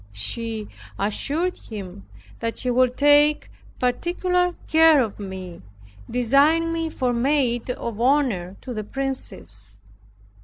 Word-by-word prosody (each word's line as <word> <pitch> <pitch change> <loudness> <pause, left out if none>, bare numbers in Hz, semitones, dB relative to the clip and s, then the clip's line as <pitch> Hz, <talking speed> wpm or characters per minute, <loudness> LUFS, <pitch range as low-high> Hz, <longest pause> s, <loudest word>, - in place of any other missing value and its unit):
She 215 - -4 0.3
assured 290 - -1
him 195 -3 -8 0.3
that 230 -1 -2
she 250 - -1
would 250 0 +2
take 290 +1 +4 0.3
particular 355 +7 0
care 320 -1 +6
of 220 -6 -1
me, 190 -3 -7 0.5
designing 285 +8 +3
me 330 -1 -1
for 255 -5 -1
maid 245 -1 +1
of 235 -3 -4
honor 240 -9 +1
to 255 - -6
the 215 -2 -4
princess. 260 - -5
250 Hz, 115 wpm, -23 LUFS, 215-295 Hz, 0.5 s, care